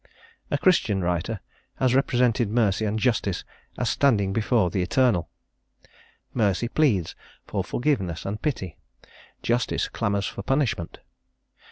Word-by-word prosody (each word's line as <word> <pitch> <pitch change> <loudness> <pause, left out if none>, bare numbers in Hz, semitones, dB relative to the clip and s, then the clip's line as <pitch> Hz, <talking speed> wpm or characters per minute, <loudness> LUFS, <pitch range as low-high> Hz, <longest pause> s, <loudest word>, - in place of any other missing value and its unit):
A - - +1
Christian 110 - +2
writer 90 +5 -1 0.3
has 130 -2 +2
represented 125 -4 +2
Mercy 110 -2 +2
and 105 +1 -1
Justice 110 -5 0 0.3
as 125 - -1
standing 110 -6 +2
before 110 -3 +2
the 95 - 0
Eternal: 105 -1 +2 1.0
Mercy 105 0 +1
pleads 115 - +1 0.3
for - - -2
forgiveness 110 - -1
and 105 +2 -4
pity, 95 - -3 0.7
Justice 120 +1 0
clamours 100 -3 -1
for - - -5
punishment. 125 - -1
110 Hz, 120 wpm, -25 LUFS, 95-125 Hz, 1.0 s, Christian